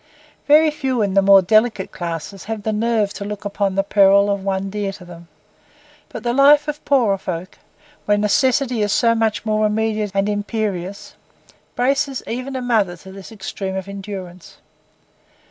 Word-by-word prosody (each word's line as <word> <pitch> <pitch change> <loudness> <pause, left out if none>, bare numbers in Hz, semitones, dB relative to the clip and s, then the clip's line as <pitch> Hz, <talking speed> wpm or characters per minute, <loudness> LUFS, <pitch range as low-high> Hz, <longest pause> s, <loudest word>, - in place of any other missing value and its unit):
Very 305 +2 +5
few 260 -6 -1
in 200 -2 -1
the 195 - +4
more 195 0 +6
delicate 215 0 +2
classes 170 +3 -6
have 220 -1 -5
the 220 - -1
nerve 215 -2 0
to - - -6
look 205 0 -7
upon 200 -1 -1
the 195 - +2
peril 200 0 +4
of 200 -1 -2
one 195 0 -2
dear 205 -1 -3
to 180 - -12
them; 170 -1 -13 0.8
but - - -8
the 240 -1 0
life 285 +3 +5
of 300 0 -5
poorer 235 -9 +2
folk, 180 -1 -6 0.5
where 205 0 +2
necessity 245 +3 +1
is 205 -1 0
so 230 +2 +3
much 225 -1 -1
more 215 0 +1
immediate 215 0 0
and 195 +1 +1
imperious, 205 -2 -3 0.6
braces 275 +2 0
even 255 +3 -5
a 255 - -3
mother 210 -8 +1
to 190 +3 -13
this 195 +2 -11
extreme 195 -2 -5
of 190 0 -5
endurance. 190 -3 -9
205 Hz, 170 wpm, -20 LUFS, 195-230 Hz, 0.8 s, more